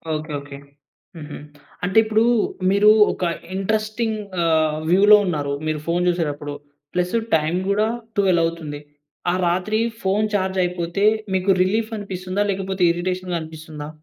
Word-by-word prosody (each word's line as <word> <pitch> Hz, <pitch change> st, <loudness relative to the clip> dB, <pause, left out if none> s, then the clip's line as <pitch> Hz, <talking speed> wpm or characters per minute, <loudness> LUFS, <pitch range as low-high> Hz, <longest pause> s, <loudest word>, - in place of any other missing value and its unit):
Okay. 155 Hz, 0 st, -5 dB
Okay. 140 Hz, 0 st, -10 dB, 0.6 s
హుహు. 150 Hz, -2 st, -8 dB, 0.5 s
అంటే 190 Hz, +3 st, 0 dB
ఇప్పుడు 220 Hz, 0 st, +2 dB, 0.5 s
మీరు 200 Hz, +2 st, +5 dB, 0.2 s
ఒక -, -, -6 dB, 0.3 s
ఇంట్రెస్టింగ్ 215 Hz, +2 st, -1 dB, 0.2 s
ఆహ్, 155 Hz, -2 st, +2 dB
వ్యూలో 205 Hz, +4 st, +7 dB
ఉన్నారు, 145 Hz, -6 st, -2 dB
మీరు 155 Hz, -1 st, -1 dB
ఫోన్ 175 Hz, +1 st, +1 dB
చూసేటప్పుడు, 150 Hz, -4 st, -2 dB, 0.4 s
ప్లస్ 180 Hz, +3 st, 0 dB, 0.2 s
టైమ్ 160 Hz, +2 st, 0 dB
కూడా 210 Hz, +2 st, +2 dB, 0.3 s
12 185 Hz, -4 st, +3 dB
అవుతుంది. 160 Hz, -3 st, -5 dB, 0.5 s
ఆ -, -, 0 dB
రాత్రి 185 Hz, +5 st, 0 dB, 0.2 s
ఫోన్ 200 Hz, +3 st, +2 dB
చార్జ్ 190 Hz, -1 st, 0 dB
అయిపోతే, 175 Hz, +2 st, -1 dB, 0.3 s
మీకు 190 Hz, +1 st, +2 dB
రిలీఫ్ 215 Hz, +4 st, 0 dB
అనిపిస్తుందా? 190 Hz, 0 st, -3 dB
లేకపోతే 190 Hz, -1 st, -2 dB
ఇరిటేషన్‌గా 180 Hz, 0 st, -2 dB
అనిపిస్తుందా? 155 Hz, -1 st, -8 dB
180 Hz, 130 wpm, -21 LUFS, 160-200 Hz, 0.6 s, వ్యూలో